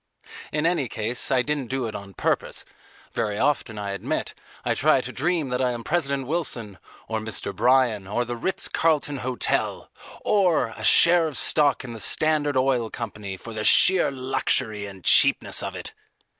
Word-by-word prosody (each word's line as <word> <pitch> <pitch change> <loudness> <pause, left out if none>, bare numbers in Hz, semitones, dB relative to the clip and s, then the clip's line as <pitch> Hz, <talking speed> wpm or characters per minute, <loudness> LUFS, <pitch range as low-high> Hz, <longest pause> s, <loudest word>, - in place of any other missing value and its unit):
In 150 +1 -1
any 165 -8 +1
case 115 +4 0
I 130 -2 +2
didn't 145 -3 -2
do 130 0 -2
it 110 - -5
on 100 -2 -9
purpose: - - -2 0.5
very 105 -2 -2
often, 115 -4 0
I 100 -1 -4
admit, 100 - -3 0.3
I - - +1
try - - +3
to - - -6
dream 160 -1 -1
that 125 +1 -1
I 125 -1 +1
am 120 -1 -6
President 140 -4 -1
Wilson, 125 - -3 0.3
or 110 0 -2
Mr. 110 -2 -4
Bryan, 120 -3 +2
or 120 +5 -1
the 120 +1 -4
Ritz 185 +11 -2
Carlton 150 -3 0
Hotel, 125 -1 -2 0.3
or 175 - +2
a 110 - -9
share 170 +6 +6
of 150 - -4
stock 145 -4 +2
in 120 -3 -7
the 115 - -8
Standard 145 +6 +1
Oil 130 -3 +1
Co. 115 -2 -5 0.3
for 115 +4 -10
the 105 -1 -4
sheer 185 +10 +5
luxury 120 -5 -1
and 95 -2 -12
cheapness - - +4
of - - -5
it. - - -7
125 Hz, 175 wpm, -24 LUFS, 110-150 Hz, 0.5 s, share